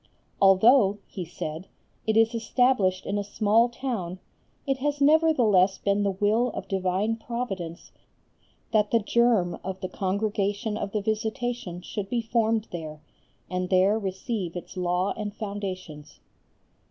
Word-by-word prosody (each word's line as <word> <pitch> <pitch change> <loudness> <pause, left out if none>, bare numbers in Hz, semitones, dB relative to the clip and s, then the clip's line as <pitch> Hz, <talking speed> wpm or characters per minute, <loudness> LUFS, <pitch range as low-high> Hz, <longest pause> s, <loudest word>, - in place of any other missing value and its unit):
"Although," 200 +2 +6
he 185 - -6
said, 165 0 -6 0.4
"it 220 0 +2
is 225 +1 +4
established 225 -5 +1
in 205 +1 -1
a - - -2
small 215 +3 +2
town, 230 -8 -4 0.5
it 270 -2 0
has 290 +2 -1
nevertheless 260 - +4
been 200 0 0
the 200 - +2
will 210 +5 +2
of - - -5
divine 195 +3 0
Providence 195 -8 -5 0.8
that 210 -2 +3
the 230 - +4
germ 225 -4 +2
of 190 0 -5
the 185 - -3
Congregation 205 +2 -1
of 200 -2 -4
the 210 - -1
Visitation 220 -3 -3
should 195 +1 -5
be 235 -1 -1
formed 225 -1 +1
there, 155 -3 -7 0.4
and 180 0 -3
there 195 +3 +3
receive 190 -2 -4
its 175 - -8
law 180 +1 0
and 210 -1 -5
foundations." 185 -8 -6
205 Hz, 140 wpm, -26 LUFS, 185-230 Hz, 0.8 s, Although